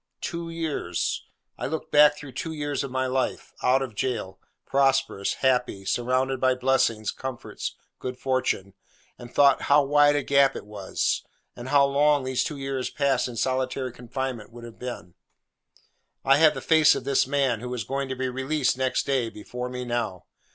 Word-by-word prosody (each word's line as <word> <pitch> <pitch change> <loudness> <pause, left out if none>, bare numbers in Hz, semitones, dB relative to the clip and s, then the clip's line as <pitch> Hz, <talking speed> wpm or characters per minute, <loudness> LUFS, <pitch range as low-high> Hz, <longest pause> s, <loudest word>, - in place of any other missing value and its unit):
Two 170 -1 -4
years! 165 -2 -2 0.3
I - - -2
looked 160 +3 -5
back 150 0 +6
through 145 -2 -9
two 160 +6 -5
years 145 -2 -2
of 140 - -4
my 130 +1 -1
own 130 - -3
life—out 130 0 0
of 125 -4 -6
jail, 105 -6 -3 0.3
prosperous, 135 -7 +1
happy, 125 -6 +1
surrounded 130 +4 0
by 130 -1 +3
blessings, 125 -4 +1
comforts, 130 -2 -6 0.2
good 125 -1 -5
fortune—and 120 -2 -4
thought 140 -1 +5
how 145 +1 +6
wide 145 +1 +4
a 145 - 0
gap 140 0 +4
it - - -7
was, 105 -2 -2 0.3
and 120 +2 -8
how 140 0 +5
long 145 0 +3
those 130 -1 0
two 150 - -4
years 135 -2 -3
passed 135 -4 +1
in 125 - -7
solitary 130 +1 -1
captivity 125 -1 -5
would 120 0 -12
have 115 -1 -11
been. 120 -8 -7 1.1
I 135 +1 +6
have 155 0 +5
the - - -5
face 160 -2 +5
of - - -4
this 135 -1 +2
man, 135 -4 +1
who 125 +2 -6
was 125 -3 -3
going 135 +4 -3
to 130 - -2
be 130 0 -2
released 130 +1 0
next 130 -1 0
day, 130 -5 0
before 125 +4 -6
me 125 0 -5
now. 115 -7 -3
130 Hz, 175 wpm, -26 LUFS, 125-140 Hz, 1.1 s, back